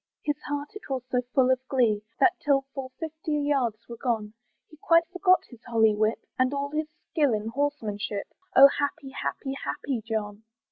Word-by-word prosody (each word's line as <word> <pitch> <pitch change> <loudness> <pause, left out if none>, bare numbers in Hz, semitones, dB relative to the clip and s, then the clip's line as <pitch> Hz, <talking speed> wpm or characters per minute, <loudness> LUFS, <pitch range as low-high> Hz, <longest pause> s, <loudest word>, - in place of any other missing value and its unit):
His 295 -1 -1
heart 290 0 -2
it 420 - -10
was 260 -2 -2
so 250 - +2
full 260 -1 +5
of 260 - +3
glee, 225 -6 +2 0.2
That 370 - +5
till 280 -2 +3
full 265 -2 -5
fifty 315 -1 -4
yards 275 -7 0
were 235 - -8
gone, 220 -4 -1 0.3
He 310 - -17
quite 335 +2 +4
forgot 370 0 +4
his 245 -2 -14
holly 220 -2 +4
whip, 215 +2 0
And 255 +2 +2
all 280 0 -2
his 305 0 -1 0.2
skill 285 -7 +3
in 215 +1 -3
horsemanship, 220 -7 -2 0.2
Oh! 275 +1 +11
happy, 285 -1 -2
happy, 270 0 -3
happy 260 -5 -3
John. 215 -1 -3
265 Hz, 180 wpm, -27 LUFS, 225-290 Hz, 0.3 s, Oh